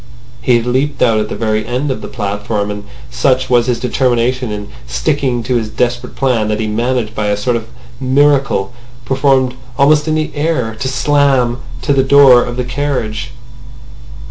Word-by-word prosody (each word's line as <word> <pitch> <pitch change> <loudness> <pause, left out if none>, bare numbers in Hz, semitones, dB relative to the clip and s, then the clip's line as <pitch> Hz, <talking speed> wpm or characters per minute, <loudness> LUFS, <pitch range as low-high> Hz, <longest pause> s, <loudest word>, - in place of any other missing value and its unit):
He 125 - +3
had 115 - -3
leaped 135 +3 0
out 115 -2 +3
at 105 0 -2
the - - -4
very 110 -1 -1
end 125 +5 -2
of 130 - -4
the - - -6
platform; 105 -1 -3
and 105 0 -7 0.3
such 130 +1 +1
was 120 -1 +3
his 125 -2 0
determination 125 -1 0
in 105 0 -6 0.2
sticking 120 - -1
to 125 +1 0
his 110 -2 -3
desperate 120 +1 -2
plan 125 -6 +1
that 105 0 -1
he 110 - -1
managed 115 +1 -1
by 105 -2 -2
a 105 0 0
sort 120 +4 0
of 115 - -4 0.3
miracle, 135 -5 +2 0.3
performed 135 -1 +2 0.2
almost 150 +2 +4
in 155 - +1
the 155 0 -1
air, 145 -7 -1
to 135 - -2
slam 135 -2 +2 0.2
to 145 - +2
the 135 - +3
door 135 -2 +6
of 120 0 -5
the 125 - -1
carriage. 125 -4 -3
125 Hz, 180 wpm, -15 LUFS, 110-135 Hz, 0.3 s, door